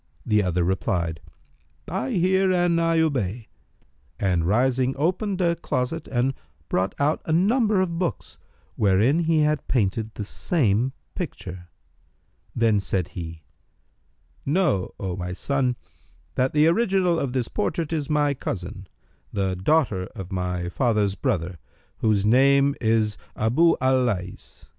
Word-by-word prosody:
The 105 -1 +3
other 90 -2 0
replied, 85 -3 -1 0.7
"I 190 +9 -2
hear 190 0 +3
and 175 -2 +2
I 165 0 +2
obey," 120 - -1 0.7
and 90 -4 +1
rising, 130 +5 +2
opened 185 +5 0
a 170 -1 +2
closet 155 0 -3
and 130 +1 0 0.4
brought 95 +1 0
out 145 +2 +1
a - - -2
number 210 +5 +3
of 170 -3 -2
books, 175 - -3 0.4
wherein 105 - +3
he 160 -1 +3
had 150 0 0
painted 110 -2 0
the 105 - -4
same 125 - 0 0.2
picture. 90 - -6 0.9
Then 115 -3 +3
said 95 -3 -2
he, 80 -3 -8 1.0
"Know, 145 - 0
O 95 -3 -3
my 90 -1 -4
son, 130 +4 0 0.6
that 130 +1 +1
the 150 0 +4
original 185 -1 +2
of 130 -3 -2
this 125 -3 -1
portrait 155 - -2
is 150 -3 -2
my 145 -1 +2
cousin, 95 -6 -6 0.4
the 95 -2 -1
daughter 100 - +1
of 95 -1 -7
my 90 -1 -2
father's 105 0 +1
brother, 90 -2 -2 0.4
whose 105 -3 +1
name 140 +4 +4
is 110 -2 +1 0.2
Abъ 160 +10 +3
al 130 0 +3
Lays. 95 -6 -5
125 Hz, 135 wpm, -24 LUFS, 95-160 Hz, 1.0 s, the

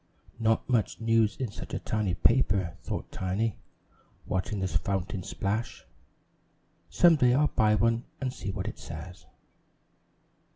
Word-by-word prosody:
"Not 115 0 +2
much 120 -4 +1
news 115 -1 +2
in 125 -6 -2
such - - -7
a - - -1
tiny 105 -5 -1
paper!" 95 -7 +2
thought - - -5
Tiny, 95 +3 -1 0.7
watching 95 +2 -2
the 95 - 0
fountain 95 +2 -2
splash. 100 +5 -3 1.0
"Some 170 -2 +5
day 125 -2 +4
I'll 150 +2 +3
buy 105 -1 +3
one 115 +2 +2
to 130 -2 -2
see 105 - -6
what 95 +1 -3
it 110 - -6
says." 85 +1 -9
105 Hz, 135 wpm, -29 LUFS, 95-115 Hz, 1.0 s, Some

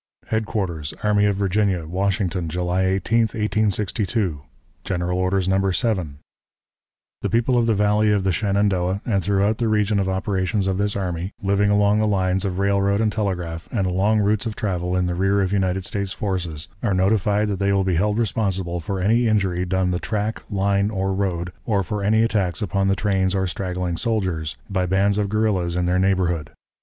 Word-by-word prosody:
_" - - -26
"HEADQUARTERS 95 -9 -2
ARMY 105 -1 +3
OF 100 - +1
VIRGINIA, 100 -3 0
WASHINGTON, 95 0 -1
July 90 +2 0
18, 95 +5 +1 0.2
1862. 105 -5 0 0.4
"(GENERAL 90 -1 -2
ORDERS, 95 0 0
No. 95 0 +2
7.) 90 - -1 1.0
"The - - -1
people 120 +2 +2
of 120 -1 +2
the 115 - +3
Valley 105 +1 +2
of 100 -2 +1
the 95 - +2
Shenandoah 100 0 0
and 100 -5 0
throughout 100 +3 +1
the 115 - +1
region 105 -1 +2
of 95 -1 0
operations 95 +1 -1
of 95 0 -1
this 105 0 0
army, 90 -1 -3
living 100 +1 +2
along 105 +1 +3
the 110 - +2
lines 95 -1 +1
of 90 -2 -2
railroad 100 +1 +2
and 110 -1 +1
telegraph, 90 -6 -3
and 100 -5 0
along 100 +4 +2
routes 105 +2 +1
of 110 - -4
travel 90 -6 -2
in 90 - +1
the 90 - -1
rear 95 +3 +1
of 95 0 0
United 95 -1 0
States 100 -3 -2
forces, 85 -6 -3
are 100 -5 0
notified 105 +2 +2
that 100 -2 -2
they 100 0 +1
will 100 -1 +2
be 95 -1 0
held 105 +4 +1
responsible 95 -6 -1
for 95 +4 -4
any 115 +5 +2
injury 95 -4 +1
done 95 0 0
the 90 - -1
track, 110 +1 -2
line, 100 0 +1
or 95 -2 -1
road, 90 -3 -2
or 100 -4 0
for 105 +4 -3
any 110 +2 +3
attacks 100 -6 0
upon 100 +1 0
the 95 - +2
trains 95 -1 0
or 95 0 +1
straggling 90 -1 -3
soldiers, 95 -8 -2
by 95 -3 -1
bands 100 +2 +2
of 100 -1 0
guerrillas 100 -5 0
in 90 0 0
their 90 +1 +1
neighborhood. 90 -5 +1
95 Hz, 190 wpm, -22 LUFS, 90-105 Hz, 1.0 s, ARMY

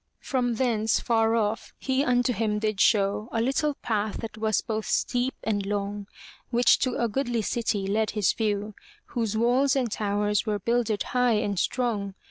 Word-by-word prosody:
From 245 -3 -1
thence, 225 -3 +1
far 225 -1 +2
off, 220 -1 -1
he 265 0 0
unto 245 -1 +2
him 215 -1 0
did 215 -2 -1
show 205 +1 +2
A 225 - -1
little 275 +5 +1
path 215 -2 -1
that 220 -2 -6
was 215 -1 +1
both 220 -1 -3
steep 250 +1 0
and 205 -2 0
long, 200 0 -3 0.4
Which 240 -1 +4
to 255 -2 0
a 235 - +1
goodly 240 -1 -1
city 215 -3 -1
led 215 +2 0
his 205 -4 +3
view. 210 -1 -1 0.4
Whose 225 -3 -1
walls 255 +4 +3
and 250 -5 0
towers 205 0 0
were 215 -2 -1
builded 230 0 0
high 250 -1 +1
and 205 -3 0
strong. 210 -6 -1
220 Hz, 170 wpm, -26 LUFS, 210-245 Hz, 0.4 s, Which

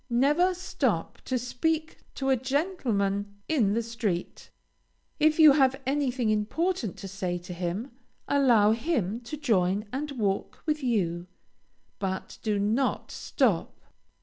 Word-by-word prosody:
Never 295 +10 +3
stop 365 - -2
to 260 - 0
speak 315 +6 -2 0.2
to 270 -1 0
a - - +5
gentleman 235 - -1
in 225 -10 +2
the 230 - 0
street. 220 -6 -3 0.7
If 310 0 +4
you 310 -2 +9
have 270 -1 +3
anything 260 -4 0
important 220 - -1
to 195 - -7
say 185 -2 -3
to 175 +1 -8
him, 180 +9 -3 0.4
allow 240 -7 +4
him 230 - -1
to 245 +6 -7
join 205 -7 +1
and 295 +3 -3
walk 205 -6 -2
with 305 -1 0
you, 180 -9 0 0.7
but 190 -1 -4
do 215 -2 0
not 220 +7 0
stop. - - 0
235 Hz, 130 wpm, -27 LUFS, 200-285 Hz, 0.7 s, you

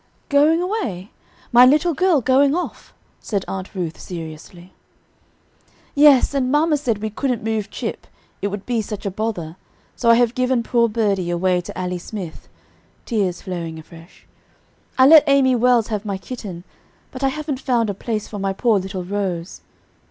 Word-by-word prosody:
"Going 305 +4 +4
away, 240 - -3 0.4
my 240 +1 +8
little 300 +6 +4
girl 340 -2 +2
going 275 +4 +3
off?" 360 - -5 0.3
said 200 -3 -3
Aunt 190 +1 -6
Ruth 170 -4 -4
seriously. 170 +1 -9 1.2
"Yes; 285 -2 +5
and 260 -2 0
mamma 300 +1 +3
said 230 -7 -2
we 220 - -2
couldn't 250 0 -2
move 220 -2 -2
Chip, - - -6 0.3
it - - 0
would 205 0 -6
be 240 -2 0
such 210 -1 -7
a 200 - -1
bother, 185 -5 -4 0.4
so 235 - +1
I 230 - +8
have 240 0 +2
given 255 -1 0
poor 235 -1 +2
birdie 205 -5 0
away 180 +1 +1
to 175 - -9
Allie 180 -1 -3
Smith;" 180 -3 -8 0.6
tears 195 -6 -1
flowing 170 -4 -5
afresh. 165 +2 -15 0.7
"I 260 - +6
let 310 +2 +9
Amy 275 -2 +4
Wells 240 -2 +3
have 210 -2 -2
my 200 -3 -3
kitten, 190 -4 -8 0.5
but 260 +1 -7
I - - +4
haven't 295 -1 -4
found 240 -5 +1
a 200 - -2
place 215 +2 -4
for 205 - -7
my 195 0 -1
poor 220 0 +2
little 190 0 -5
rose. 185 -2 -4
220 Hz, 165 wpm, -20 LUFS, 185-260 Hz, 1.2 s, let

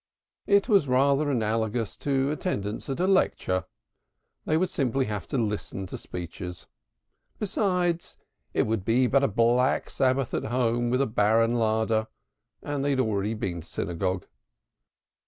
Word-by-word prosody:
It 200 +1 +4
was 200 - +4
rather 140 +3 +3
analogous 110 -2 -1
to 135 0 0
attendance 110 - -3
at 135 - -3
a 180 - +2
lecture 95 - +1 0.8
they 155 - +2
would 185 +2 0
simply 135 -1 0
have 105 -3 -4
to - - -2
listen 105 -3 -2
to 90 - -7
speeches. 90 0 -7 0.7
Besides 180 -4 0 0.3
it - - +2
would 110 -3 -1
be 120 +5 +3
but 140 +2 +3
a - - +4
black 120 +4 +2
Sabbath 130 -1 +1
at - - -1
home 120 0 +1
with 125 +3 +2
a - - +1
barren 115 0 +2
larder, 110 -1 +1 0.6
and 145 -2 -2
they 145 - +1
had 135 -2 +1
already 110 -2 0
been 90 -5 -3
to - - -14
synagogue. 90 +1 -2
120 Hz, 150 wpm, -27 LUFS, 105-140 Hz, 0.8 s, It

